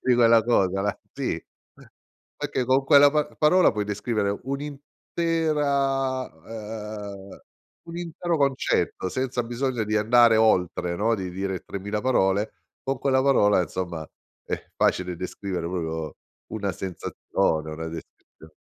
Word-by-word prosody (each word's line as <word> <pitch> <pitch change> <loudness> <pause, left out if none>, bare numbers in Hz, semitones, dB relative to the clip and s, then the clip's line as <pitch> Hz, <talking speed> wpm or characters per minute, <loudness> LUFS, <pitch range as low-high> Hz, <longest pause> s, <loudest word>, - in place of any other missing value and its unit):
di 125 -1 +3
quella 115 -1 +6
cosa 95 -5 +2
la 105 -3 -1
sì - - -3 0.9
perché 125 - -2
con 130 +2 +2
quella 145 0 +7
pa 150 0 +1
parola 175 +4 +5
puoi 105 -2 -1
descrivere 105 -1 -1
un'intera 140 -1 -1
uhm, 105 0 -8 0.5
un 170 0 -7
intero 170 0 -2
concetto 135 -8 0
senza 130 +2 -1
bisogno 120 -1 -2
di 110 +1 0
andare 115 +1 +5
oltre, 90 -5 +2
no, 115 +3 +2
di 95 -3 -4
dire 95 0 -3
3000 100 +2 -4
parole, 105 -4 +2 0.3
con 135 -1 -2
quella 130 0 +2
parola, 105 -8 +4
insomma, 85 -3 -4 0.4
è - - -5
facile 90 -1 +1
descrivere 90 0 -4
proprio 80 -4 -4 0.4
una 100 -3 -2
sensazione, 80 -3 -2
una 80 +1 -5
descrizio 80 -1 -12
110 Hz, 125 wpm, -25 LUFS, 95-135 Hz, 0.9 s, quella